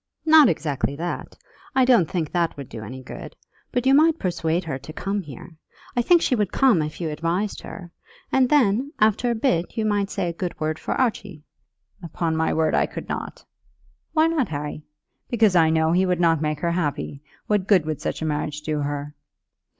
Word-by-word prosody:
"Not 315 Hz, -4 st, +7 dB
exactly 145 Hz, -3 st, -1 dB
that; 170 Hz, +4 st, -5 dB, 0.4 s
I 260 Hz, -, +5 dB
don't 235 Hz, -11 st, +4 dB
think 165 Hz, -5 st, -2 dB
that 170 Hz, -3 st, 0 dB
would 140 Hz, -3 st, -7 dB
do 115 Hz, -, -8 dB
any 130 Hz, +4 st, -8 dB
good. -, -, -9 dB, 0.4 s
But 245 Hz, 0 st, -1 dB
you 265 Hz, -, +5 dB
might 315 Hz, +3 st, +5 dB
persuade 175 Hz, -, -1 dB
her 140 Hz, -5 st, -4 dB
to 140 Hz, +3 st, -10 dB
come 200 Hz, +5 st, -3 dB
here. 155 Hz, +1 st, -11 dB, 0.4 s
I 245 Hz, -, +3 dB
think 340 Hz, +7 st, +4 dB
she -, -, +1 dB
would 210 Hz, -6 st, 0 dB
come 255 Hz, -, +4 dB
if 150 Hz, 0 st, -5 dB
you 165 Hz, -3 st, -2 dB
advised 170 Hz, +7 st, -2 dB
her; 175 Hz, -3 st, -9 dB, 0.4 s
and 260 Hz, -2 st, +3 dB
then, 265 Hz, 0 st, +2 dB
after 220 Hz, +3 st, +3 dB
a 235 Hz, -, +1 dB
bit, 220 Hz, -8 st, 0 dB
you 220 Hz, -, 0 dB
might 205 Hz, -2 st, 0 dB
say 175 Hz, -, -2 dB
a 170 Hz, -, -2 dB
good 175 Hz, +1 st, -5 dB
word 155 Hz, 0 st, -2 dB
for -, -, -3 dB
Archie." 205 Hz, -, -2 dB, 0.6 s
"Upon 165 Hz, -1 st, -2 dB
my 160 Hz, 0 st, +1 dB
word 160 Hz, -1 st, +1 dB
I -, -, +2 dB
could -, -, -8 dB
not." -, -, -5 dB, 0.7 s
"Why 315 Hz, 0 st, +4 dB
not, 325 Hz, -6 st, +1 dB
Harry?" 150 Hz, 0 st, -5 dB, 0.5 s
"Because 220 Hz, -5 st, +3 dB
I 165 Hz, -2 st, +5 dB
know 160 Hz, 0 st, +2 dB
he 185 Hz, +2 st, +3 dB
would 180 Hz, -1 st, 0 dB
not 165 Hz, -3 st, +3 dB
make 150 Hz, -1 st, -2 dB
her 170 Hz, -, +1 dB
happy. 145 Hz, -4 st, -2 dB, 0.2 s
What 205 Hz, -3 st, 0 dB
good 190 Hz, -7 st, +4 dB
would 155 Hz, -1 st, -3 dB
such -, -, -3 dB
a -, -, -1 dB
marriage 150 Hz, -1 st, -2 dB
do 150 Hz, 0 st, -2 dB
her?" 145 Hz, 0 st, -3 dB
170 Hz, 205 wpm, -23 LUFS, 155-215 Hz, 0.7 s, Not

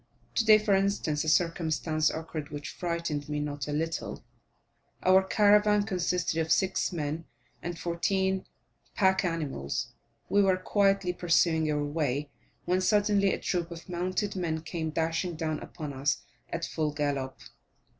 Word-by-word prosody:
Today, 220 Hz, -2 st, +6 dB
for 210 Hz, -1 st, +1 dB
instance, 195 Hz, -6 st, +1 dB
a 155 Hz, -, 0 dB
circumstance 160 Hz, -2 st, +1 dB
occurred 160 Hz, -2 st, -5 dB
which 145 Hz, -1 st, -6 dB
frightened 170 Hz, -4 st, -3 dB
me 150 Hz, 0 st, -1 dB
not 145 Hz, -2 st, -3 dB
a -, -, -3 dB
little: 160 Hz, +2 st, -3 dB, 0.8 s
our 185 Hz, +1 st, +6 dB
caravan 210 Hz, +1 st, +4 dB
consisted 180 Hz, -4 st, 0 dB
of 160 Hz, 0 st, -1 dB
six 190 Hz, +3 st, +2 dB
men 160 Hz, -1 st, -3 dB, 0.4 s
and 175 Hz, 0 st, -4 dB
fourteen 190 Hz, +3 st, 0 dB, 0.5 s
pack 190 Hz, -2 st, +3 dB
animals; 150 Hz, -, -2 dB, 0.4 s
we 205 Hz, -, +4 dB
were 190 Hz, -2 st, +3 dB
quietly 195 Hz, -1 st, +2 dB
pursuing 165 Hz, -3 st, +2 dB
our 150 Hz, -1 st, 0 dB
way, 145 Hz, -1 st, -1 dB, 0.3 s
when 180 Hz, +1 st, +2 dB
suddenly 205 Hz, 0 st, +3 dB
a -, -, 0 dB
troop 175 Hz, -2 st, -2 dB
of 170 Hz, -1 st, -9 dB
mounted 185 Hz, +3 st, -2 dB
men 165 Hz, -4 st, -1 dB
came 160 Hz, 0 st, -3 dB
dashing 165 Hz, +2 st, -1 dB
down 155 Hz, -1 st, -2 dB
upon 150 Hz, -3 st, -7 dB
us 135 Hz, +3 st, 0 dB, 0.3 s
at 170 Hz, 0 st, -3 dB
full 155 Hz, -2 st, -1 dB
gallop. 140 Hz, -3 st, -2 dB
170 Hz, 145 wpm, -29 LUFS, 155-190 Hz, 0.8 s, Today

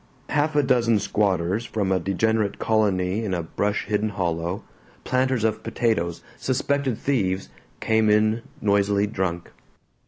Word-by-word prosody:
Half 150 Hz, +1 st, +1 dB
a 145 Hz, -, +4 dB
dozen 115 Hz, -4 st, +3 dB
squatters 100 Hz, 0 st, 0 dB
from 105 Hz, -4 st, -2 dB
a 95 Hz, -, +2 dB
degenerate 105 Hz, +3 st, 0 dB
colony 105 Hz, -2 st, +1 dB
in 95 Hz, -4 st, -1 dB
a 85 Hz, -, -2 dB
brush 100 Hz, +5 st, -1 dB
hidden 105 Hz, 0 st, 0 dB
hollow, 85 Hz, -1 st, -2 dB, 0.4 s
planters 130 Hz, -2 st, +1 dB
of 110 Hz, -1 st, 0 dB
potatoes, 110 Hz, -8 st, -1 dB
suspected 135 Hz, -1 st, 0 dB
thieves, 95 Hz, -9 st, -1 dB, 0.3 s
came 110 Hz, -1 st, +2 dB
in 110 Hz, +2 st, +3 dB, 0.2 s
noisily 100 Hz, 0 st, +2 dB
drunk. 95 Hz, -4 st, -3 dB
105 Hz, 130 wpm, -24 LUFS, 95-115 Hz, 0.4 s, a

